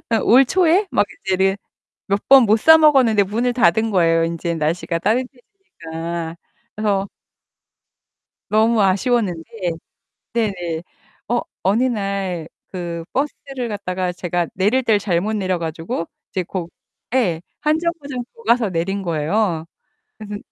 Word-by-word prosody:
아 225 - +2
올 260 +4 +6
초에 370 - +3
막 - - +3 0.2
이제 190 -1 +1
이래 190 +1 +2 0.5
몇 200 +1 -1
번 265 -3 +8
못 215 +2 +4
사 320 +4 +8
먹었는데 260 -9 +5
문을 235 +5 -1
닫은 225 -2 +3
거예요. 165 -3 +3
인제 170 0 -2
날씨가 165 +2 -1
따뜻해지니까 170 - -4 0.4
그래서 200 -2 0 1.4
너무 220 +1 +3
아쉬웠는데 195 -3 +1 0.9
네네. 175 -7 -2 0.5
어 240 0 +1 0.2
어느 205 +7 +2
날 195 -8 -2 0.3
그 170 -2 -4
버스를 270 -3 -3
갖다가 185 -3 -2
제가 175 -1 -2
내릴 210 +8 +2
때를 225 -4 +3
잘못 200 +1 -1
내려 185 -4 -1
가지고 165 0 -4 0.2
이제 185 - -1
고 175 -1 -5 0.4
예. 185 -11 +2 0.2
1 305 +1 +2
정거장 290 -7 -3
더 465 - -16
가서 235 - +3
내린 195 +4 -2
거예요. 165 +1 0 0.5
그래서 210 -1 -6
200 Hz, 260 characters per minute, -20 LUFS, 175-240 Hz, 1.4 s, 번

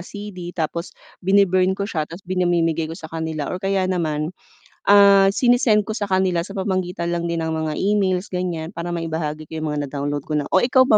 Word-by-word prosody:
CD 185 -2 -8
tapos 170 +2 -3 0.2
bin-burn 190 -1 +3
ko 200 - -2
siya, 160 -7 -3
tapos 170 +3 -10
pinamimigay 170 -3 +1
ko 165 - -6
sa - - -13
kanila 160 -2 -3
or 185 - -4
kaya 195 -1 +1
naman, 160 -3 -1 0.6
ah, 200 -1 +7
sinesend 235 -2 +3
ko 220 - -3
sa 205 -2 -3
kanila 185 -2 +2
sa 195 +3 -8
pamamagitan 185 -2 -1
lang 170 0 -2
din 165 -1 -1
ng 160 - -2
mga 160 -1 -2
emails 195 -2 +1
ganyan, 175 -3 -3
para 170 +1 -5
maibahagi 160 -2 -3
ko 160 +1 -6
'yong 155 - -2
mga 150 0 -2
na - - -10
download 145 0 -2
ko 155 - -4
na - - -7
o - - +3
ikaw 255 +5 +4
ba, 215 - +7
175 Hz, 210 wpm, -21 LUFS, 160-195 Hz, 0.6 s, ah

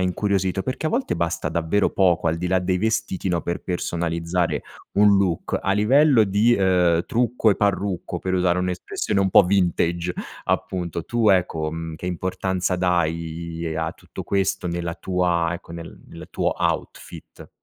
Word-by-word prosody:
incuriosito. 95 0 0
Perché 130 +4 -3
a - - 0
volte 260 +3 -1
basta 85 0 -1
davvero 85 +5 +1
poco, 90 -3 +2
al 80 - 0
di 90 - -3
là 95 +1 +2
dei 90 0 0
vestiti, 110 -2 -1
no, 85 -2 0
per 85 - -3
personalizzare 85 0 -1 0.3
un 100 0 +5
look. 95 -4 0
A 95 - 0
livello 125 +5 +4
di, 105 +4 +3
uhm, 90 -3 +3
trucco 120 -1 +1
e 100 - +1
parrucco, 95 -3 -1
per 95 0 -2
usare 90 0 +2
un'espressione 90 +2 -2
un 95 -1 +2
po' 100 - +7
vintage, 90 -2 0 0.3
appunto. 85 -2 -2
Tu, 115 -3 +2
ecco, 85 -4 +1
mhmm, 80 -1 -5
che 90 - -7
importanza 95 +1 -1
dai 85 -2 -1
a 80 0 -1
tutto - - -10
questo? 95 -2 -1
Nella 85 -1 -3
tua 90 -1 0
ecco, 85 -1 -8
nel 85 0 -9
nel - - -11
tuo - - 0
outfit? - - -4
90 Hz, 160 wpm, -23 LUFS, 85-100 Hz, 0.3 s, po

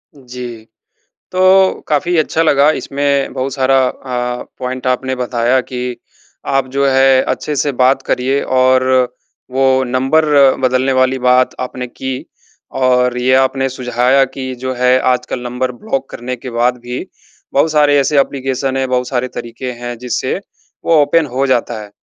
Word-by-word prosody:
जी। 125 -4 -9 0.7
तो 185 +1 +4
काफ़ी 155 +4 0
अच्छा 160 +1 +1
लगा 145 -1 +4
इसमें 140 0 -1
बहुत 130 +1 -3
सारा 135 0 +2
अ, 125 -1 -4 0.2
पॉइंट 130 0 -4
आपने 130 +1 0
बताया 125 0 +1
कि 125 -1 -5 0.5
आप 135 -1 0
जो 140 +1 0
है, 135 0 +4
अच्छे 150 - -3
से 145 +1 0
बात 130 +1 +2
करिए 135 +2 0
और 130 0 +3 0.7
वो 130 0 +2
नंबर 130 +5 +1 0.4
बदलने 130 +1 +1
वाली 130 0 +2
बात 125 0 +3
आपने 125 0 -5
की, 130 +1 -6 0.5
और 125 -1 +1
ये 130 +1 +2
आपने 135 0 +2
सुझाया 125 +1 +1
कि 130 0 -6
जो 130 +1 -4
है 125 +1 +3 0.2
आजकल 125 0 -4
नंबर 125 +1 -3
ब्लॉक 135 +2 -4
करने 125 +1 -5
के 125 +1 -8
बाद 120 +1 0
भी 125 +1 -5 0.5
बहुत 150 +3 +2
सारे 145 -1 +4
ऐसे 140 +1 +2
एप्लीकेशन 135 -1 -1
है, 135 - 0
बहुत 125 0 -1
सारे 130 -1 -1
तरीके 125 +1 -6
हैं 120 0 -7
जिससे 125 +5 -2 0.5
वो 165 -2 +4
ओपन 155 +3 +2
हो 135 +2 0
जाता 120 -3 0
है। 105 - -11
130 Hz, 155 wpm, -15 LUFS, 125-135 Hz, 0.7 s, तो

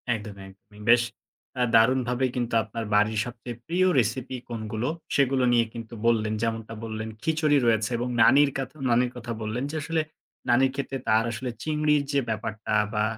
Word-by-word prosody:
একদমই, 100 -2 -8
একদমই। 105 +2 -18
বেশ 120 0 +7 0.6
আ - - +5
দারুনভাবেই 125 +2 +3
কিন্তু 120 -2 -2
আপনার 110 +1 -5
বাড়ির 105 +1 +3
সবচেয়ে 120 0 -7
প্রিয় 185 +2 +2
recipe 125 +3 -1
কোনগুলো 110 0 -3 0.3
সেগুলো 135 -2 +2
নিয়ে 120 -1 +4
কিন্তু 115 0 -8
বললেন। 110 -2 +2
যেমনটা 115 -1 -3
বললেন 110 -1 -5
"খিচুড়ি 155 -2 +2
রয়েছে 110 -2 +2
এবং 120 +2 -2 0.2
নানির 140 +4 +5
কথা 135 +3 -5 0.2
নানির 120 +1 +3
কথা 120 -1 -6
বললেন, 110 +4 -3
যে - - -6
আসলে 160 +2 0 0.5
নানির 130 +2 +4
ক্ষেত্রে 135 -1 -3
তার 110 +1 +4
আসলে 120 +2 -4
চিংড়ির 150 -1 +2
যে 140 - +2
ব্যাপারটা" 110 -1 -4 0.2
বা 105 0 +1
120 Hz, 165 wpm, -26 LUFS, 110-130 Hz, 0.6 s, বেশ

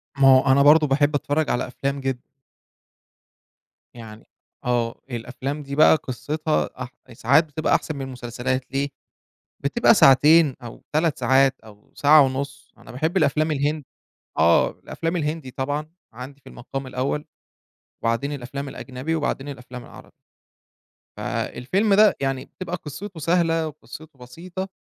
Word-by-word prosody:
ما 135 -1 +4
هو 130 0 +6
أنا 140 +1 +5
برضه 150 +1 +6
باحب 145 +2 +2
أتفرّج 145 +2 0
على 125 - -1
أفلام 140 +2 -3
جدًا. 130 -2 -3 1.7
يعني 110 -2 -12 0.4
آه، 120 -1 -1
الأفلام 130 +5 -5
دي 140 0 -6
بقى 155 +2 +6
قِصّتها 155 +3 -2
أح 125 - -9 0.2
ساعات 140 +8 +3
بتبقى 155 +1 0
أحسن 155 - -2
من 140 - -6
المسلسلات، 130 0 -4
ليه؟ 140 +1 -1 0.7
بتبقى 190 +12 +3
ساعتين 150 - +6
أو 115 - -10
3 155 -1 +1
ساعات 135 0 +3
أو 105 -2 -18
ساعة 150 +1 +6
ونُص. 135 +1 -3
أنا - - -14
باحب 160 +9 -1
الأفلام 155 -1 +2
الهن 150 +1 -1 0.5
آه، - - +4
الأفلام 165 +2 -5
الهندي 150 -4 -3
طبعًا 145 +4 -3 0.2
عندي 130 +4 -10
في - - -14
المقام 135 +2 -7
الأول 135 +4 -2 0.8
وبعدين 115 +5 -1
الأفلام 140 +1 -6
الأجنبي 130 +5 -5
وبعدين 145 -2 -2
الأفلام 125 -2 -9
العربي. - - -14 1.1
فالفيلم 195 - -1
ده 210 0 +6
يعني 135 -1 -2
بتبقى 180 -1 -6
قِصّته 165 +3 -8
سهلة 165 0 +1
وقِصّته 155 -1 -12
بسيطة 175 +10 -7
140 Hz, 135 wpm, -23 LUFS, 130-155 Hz, 1.7 s, هو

